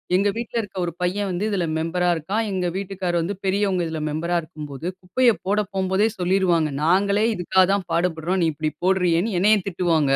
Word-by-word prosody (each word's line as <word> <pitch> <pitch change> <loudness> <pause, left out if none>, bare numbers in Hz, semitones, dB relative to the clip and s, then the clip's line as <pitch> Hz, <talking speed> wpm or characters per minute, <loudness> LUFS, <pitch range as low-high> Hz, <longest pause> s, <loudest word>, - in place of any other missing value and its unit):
எங்க 200 +2 +3
வீட்ல 235 0 -5
இருக்க 205 -3 -10
ஒரு 170 - -3
பையன் 195 +3 0
வந்து 180 +2 -2
இதில 190 -5 0
மெம்பரா 170 +3 0
இருக்கான். 195 +8 -2
எங்க 185 -2 -1
வீட்டுக்காரர் 190 -3 -2
வந்து, 185 +5 -2
பெரியவங்க 195 -1 +1
இதில 160 -1 -4
மெம்பரா 170 +3 -1
இருக்கும்போது, 150 -1 -7
குப்பைய 235 +7 +3
போட 205 +2 +2 0.2
போம்போதே, 190 +2 +2
சொல்லிருவாங்க. 180 -4 +2
நாங்களே 200 +5 +3
இதுக்காக 185 +1 +3
தான் 195 -3 -1
பாடுபடுறோம். 175 +1 0
நீ - - +3
இப்டி 155 +1 -2
போடுறியேன்னு, 185 +2 +2
என்னைய 210 +3 +5
திட்டுவாங்க. 170 -6 +1
180 Hz, 170 wpm, -23 LUFS, 170-195 Hz, 0.2 s, என்னைய